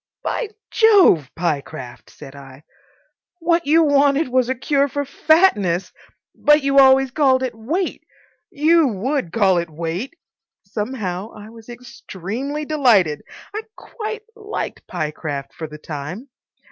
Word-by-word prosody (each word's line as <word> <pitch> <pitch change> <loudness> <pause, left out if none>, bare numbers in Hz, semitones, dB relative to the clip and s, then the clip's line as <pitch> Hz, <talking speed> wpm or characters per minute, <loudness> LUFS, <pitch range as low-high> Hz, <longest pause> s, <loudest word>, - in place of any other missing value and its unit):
"By 475 - -2 0.2
Jove, 390 - +5
Pyecraft," 140 -7 -4
said 140 -1 -13
I, 135 0 -13 0.7
"what 335 -2 0
you 325 +2 +5
wanted 285 0 +3
was 255 -1 +1
a 260 - 0
cure 280 +3 +1
for 285 +1 -3
fatness! 235 - +2 0.4
But 295 -1 +3
you 275 0 +4
always 265 -1 +5
called 260 -2 +2
it 255 - -2
weight. 305 - -3 0.5
You 315 +1 +3
would 235 - -2
call 190 -4 +3
it 170 -1 -4
weight." 170 - -5 0.5
Somehow 210 -4 -4
I 210 +1 -11
was 225 0 -15
extremely 245 - -6
delighted. 225 - +3 0.3
I 430 - -3
quite 440 -1 -7
liked 430 -1 -6
Pyecraft 150 -2 -5
for 160 -2 -7
the 150 0 -10
time. 155 - -7
250 Hz, 130 wpm, -20 LUFS, -, 0.7 s, Jove